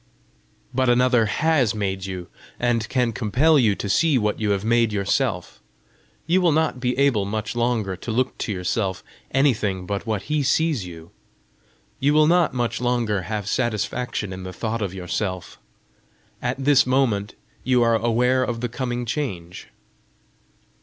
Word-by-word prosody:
"But 130 Hz, 0 st, +2 dB
another 120 Hz, -2 st, +3 dB
has 140 Hz, -4 st, +1 dB
made 95 Hz, -2 st, -2 dB
you, 90 Hz, -2 st, -6 dB, 0.3 s
and 120 Hz, -2 st, 0 dB
can 125 Hz, -3 st, +1 dB
compel 130 Hz, +8 st, +3 dB
you 110 Hz, -5 st, +3 dB
to 100 Hz, -, -5 dB
see 155 Hz, +7 st, +3 dB
what 105 Hz, -3 st, 0 dB
you 110 Hz, -1 st, 0 dB
have 100 Hz, 0 st, 0 dB
made 115 Hz, -1 st, +3 dB
yourself. 100 Hz, -2 st, -1 dB, 0.7 s
You 180 Hz, +3 st, +2 dB
will 175 Hz, -2 st, +4 dB
not 155 Hz, -4 st, +1 dB
be 125 Hz, 0 st, -1 dB
able 135 Hz, -7 st, +3 dB
much 110 Hz, +3 st, -3 dB
longer 115 Hz, -5 st, 0 dB
to 95 Hz, -, -9 dB
look 130 Hz, +3 st, 0 dB
to -, -, -2 dB
yourself 95 Hz, +1 st, -2 dB, 0.3 s
anything 105 Hz, -9 st, +1 dB
but 100 Hz, +3 st, -4 dB
what 105 Hz, -3 st, -1 dB
he 150 Hz, 0 st, 0 dB
sees 140 Hz, -, +1 dB
you! 85 Hz, -1 st, -11 dB, 0.9 s
You 145 Hz, +2 st, +2 dB
will 155 Hz, 0 st, +6 dB
not 175 Hz, +1 st, +3 dB
much 120 Hz, -2 st, -2 dB
longer 120 Hz, -5 st, 0 dB
have 105 Hz, -3 st, -3 dB
satisfaction 120 Hz, -2 st, -2 dB
in 95 Hz, -, -7 dB
the 95 Hz, 0 st, -7 dB
thought 115 Hz, +4 st, -3 dB
of 100 Hz, -3 st, -2 dB
yourself. 90 Hz, 0 st, -4 dB, 0.8 s
At 125 Hz, +1 st, -2 dB
this 140 Hz, -3 st, +5 dB
moment 120 Hz, -6 st, +1 dB, 0.3 s
you 125 Hz, -2 st, +3 dB
are 115 Hz, -1 st, +3 dB
aware 120 Hz, +3 st, +2 dB
of 120 Hz, -2 st, -3 dB
the 120 Hz, -, -2 dB
coming 120 Hz, 0 st, -3 dB
change!" 95 Hz, -, -4 dB
115 Hz, 160 wpm, -23 LUFS, 100-130 Hz, 0.9 s, will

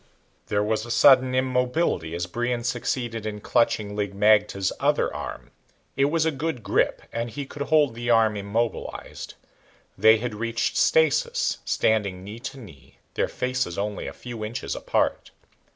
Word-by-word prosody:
There 105 Hz, 0 st, +1 dB
was 110 Hz, +1 st, 0 dB
a 120 Hz, -, -9 dB
sudden 130 Hz, +1 st, +5 dB
immobility 125 Hz, -, 0 dB
as 85 Hz, 0 st, -2 dB
Brion 120 Hz, +4 st, -2 dB
succeeded 120 Hz, -2 st, -2 dB
in 105 Hz, -1 st, -4 dB
clutching 105 Hz, -2 st, +1 dB
Lig 100 Hz, -2 st, -3 dB
magte's 105 Hz, -2 st, +3 dB
other -, -, +1 dB
arm. -, -, -7 dB, 0.4 s
It 135 Hz, -, +3 dB
was 160 Hz, +2 st, +1 dB
a 160 Hz, -, +2 dB
good 140 Hz, -4 st, -3 dB
grip, 95 Hz, -, +1 dB
and 115 Hz, +1 st, -2 dB
he 140 Hz, +5 st, -5 dB
could 140 Hz, +2 st, -10 dB
hold 150 Hz, -3 st, +3 dB
the 120 Hz, +1 st, -4 dB
arm 110 Hz, -2 st, +4 dB
immobilized. 105 Hz, +3 st, -4 dB, 0.6 s
They 110 Hz, +2 st, +6 dB
had 120 Hz, +1 st, -4 dB
reached 115 Hz, +1 st, -2 dB
stasis, 160 Hz, -4 st, +2 dB
standing 100 Hz, -4 st, 0 dB
knee 105 Hz, +4 st, -8 dB
to 135 Hz, -, -7 dB
knee, 75 Hz, -, -14 dB, 0.2 s
their -, -, 0 dB
faces 125 Hz, -8 st, -2 dB
only 105 Hz, +1 st, -3 dB
a -, -, -6 dB
few 120 Hz, -3 st, -8 dB
inches 115 Hz, +4 st, -4 dB
apart. -, -, -1 dB
115 Hz, 155 wpm, -25 LUFS, 105-125 Hz, 0.6 s, They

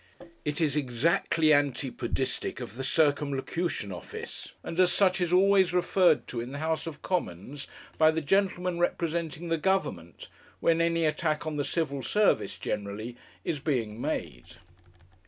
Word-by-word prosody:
It 145 Hz, 0 st, -2 dB
is 155 Hz, -4 st, +2 dB
exactly 155 Hz, +4 st, +2 dB
antipodistic 135 Hz, -3 st, -1 dB
of 120 Hz, -3 st, -7 dB
the 130 Hz, +3 st, -5 dB
Circumlocution 145 Hz, -, 0 dB
Office, 90 Hz, -, -8 dB
and 165 Hz, -, -5 dB
as 180 Hz, -1 st, +5 dB
such 190 Hz, -2 st, +3 dB
is 175 Hz, -1 st, 0 dB
always 190 Hz, 0 st, +5 dB
referred 180 Hz, -2 st, +3 dB
to 120 Hz, -, -3 dB
in 125 Hz, +3 st, -7 dB
the -, -, -4 dB
House 160 Hz, +2 st, -1 dB
of 150 Hz, -2 st, -8 dB
Commons 140 Hz, -, -3 dB, 0.3 s
by 155 Hz, 0 st, +7 dB
the 160 Hz, +1 st, +1 dB
gentleman 180 Hz, +1 st, +1 dB
representing 170 Hz, -1 st, -1 dB
the 165 Hz, -1 st, +1 dB
Government 150 Hz, -, -1 dB, 0.3 s
when 165 Hz, 0 st, +3 dB
any 165 Hz, -1 st, +2 dB
attack 155 Hz, 0 st, 0 dB
on 155 Hz, -1 st, -3 dB
the 145 Hz, -, 0 dB
Civil 140 Hz, -3 st, -1 dB
Service, 210 Hz, +9 st, +2 dB
generally, 105 Hz, +4 st, -4 dB, 0.3 s
is 150 Hz, -, -1 dB
being 120 Hz, -6 st, -2 dB
made. 80 Hz, -, -4 dB
155 Hz, 145 wpm, -28 LUFS, 130-170 Hz, 0.3 s, by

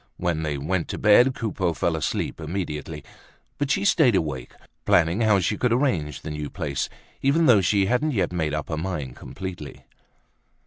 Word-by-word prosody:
When 85 Hz, -3 st, -1 dB
they 75 Hz, -2 st, -2 dB
went 85 Hz, +5 st, -1 dB
to -, -, -4 dB
bed, 120 Hz, +5 st, +5 dB
Coupeau 95 Hz, -6 st, -1 dB
fell 80 Hz, +2 st, 0 dB
asleep 80 Hz, +1 st, -2 dB
immediately, 75 Hz, -3 st, -4 dB, 0.6 s
but 145 Hz, -1 st, -1 dB
she 200 Hz, -, +1 dB
stayed 155 Hz, -, +4 dB
awake, 70 Hz, -8 st, -2 dB, 0.3 s
planning 85 Hz, +5 st, +3 dB
how 105 Hz, -3 st, +4 dB
she 100 Hz, +3 st, 0 dB
could 125 Hz, -, +1 dB
arrange 95 Hz, -, 0 dB
the 75 Hz, -, -6 dB
new 75 Hz, -1 st, -4 dB
place 70 Hz, -7 st, -3 dB, 0.3 s
even 150 Hz, +5 st, +3 dB
though 115 Hz, -8 st, +6 dB
she 95 Hz, +2 st, +2 dB
hadn't 125 Hz, +9 st, +1 dB
yet 90 Hz, -5 st, 0 dB
made 80 Hz, -3 st, -1 dB
up 75 Hz, -, -4 dB
her 80 Hz, -, -2 dB
mind 80 Hz, -7 st, -4 dB
completely. 90 Hz, -6 st, -8 dB
90 Hz, 175 wpm, -24 LUFS, 75-110 Hz, 0.6 s, though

